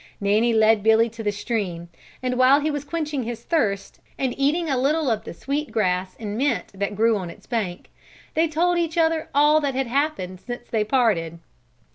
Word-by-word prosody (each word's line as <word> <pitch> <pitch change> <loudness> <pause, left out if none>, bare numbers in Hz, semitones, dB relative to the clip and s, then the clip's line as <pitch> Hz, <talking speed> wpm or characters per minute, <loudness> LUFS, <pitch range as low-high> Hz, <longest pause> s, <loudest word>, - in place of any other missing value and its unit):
Nanny 210 +4 +2
led 220 -1 +4
Billy 220 +2 +4
to 230 +1 -9
the 210 -2 0
stream 200 -5 -3 0.4
and 250 0 0
while 255 +3 +5
he 305 +1 -1
was 290 -1 -3
quenching 300 -2 -3
his 235 -1 -5
thirst 205 - -1 0.2
and 260 -2 -1
eating 300 +5 +1
a 275 - +1
little 280 +2 +1
of 220 - -2
the - - -7
sweet 285 - -3
grass 185 -3 0
and 210 -2 -4
mint 255 -9 0
that 200 +1 -3
grew 225 +2 +3
on 185 -3 -5
its - - -13
bank, 210 -7 -3 0.4
they 325 +1 +2
told 345 +3 +1
each 335 0 -2
other 325 -1 +1
all 300 +2 +5
that 280 -3 -1
had 265 0 0
happened 240 - -2
since 240 0 -7
they 220 -2 +1
parted. 210 -9 +1
240 Hz, 195 wpm, -23 LUFS, 210-290 Hz, 0.4 s, while